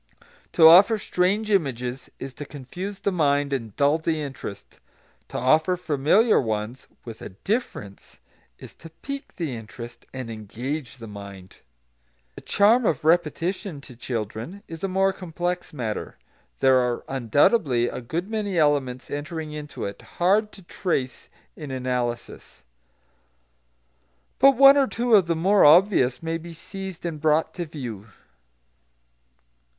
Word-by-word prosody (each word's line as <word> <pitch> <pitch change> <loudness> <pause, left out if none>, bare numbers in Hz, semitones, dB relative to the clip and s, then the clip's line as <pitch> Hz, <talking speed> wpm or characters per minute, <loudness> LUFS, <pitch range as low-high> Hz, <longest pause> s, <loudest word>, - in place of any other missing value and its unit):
To 160 - +8
offer 195 +7 +8
strange 205 +3 0
images 130 - -1
is 135 -1 -7
to 145 - -8
confuse 175 +9 -7
the 200 - 0
mind 145 -4 +1
and 115 -6 -4
dull 145 +3 +3
the 160 0 -1
interest; 135 -8 -8 0.5
to - - -6
offer 155 +8 +3
familiar 170 - +3
ones 110 +1 -4 0.2
"with 115 -2 -9
a - - -7
difference" 105 - -5 0.4
is - - -12
to 165 - -13
pique 275 - -8
the 160 -9 -3
interest 115 +1 -10
and 130 -3 -6
engage 120 +6 -6
the 115 - -9
mind. 100 -3 -11 0.8
The - - -11
charm 220 +5 +3
of 155 - 0
repetition, 170 +1 0
to 130 -3 -11
children, 115 - -5
is 165 +1 -9
a - - +1
more 190 +1 +1
complex 175 0 -4
matter; 120 -7 -5 0.4
there 130 -1 +5
are 125 -1 -1
undoubtedly 135 - +2
a - - -5
good 165 +10 -4
many 210 -4 -2
elements 140 -5 +1
entering 150 +2 -5
into 150 -1 -6
it, 100 0 -7 0.2
hard 205 +5 +2
to 195 - -13
trace 155 -8 -3 0.3
in 150 -3 -8
analysis. 125 -2 -4 1.8
But 275 0 +6
one 275 +1 +8
or 275 -1 +4
two 240 0 -1
of 195 -5 +6
the 165 - +1
more 190 +5 +3
obvious 150 -5 +5
may 165 0 -2
be 170 +1 -10
seized 190 +1 -8
and 160 -3 -4
brought 160 +1 +2
to 175 -2 -5
view. 120 -9 -7
155 Hz, 140 wpm, -24 LUFS, 125-185 Hz, 1.8 s, To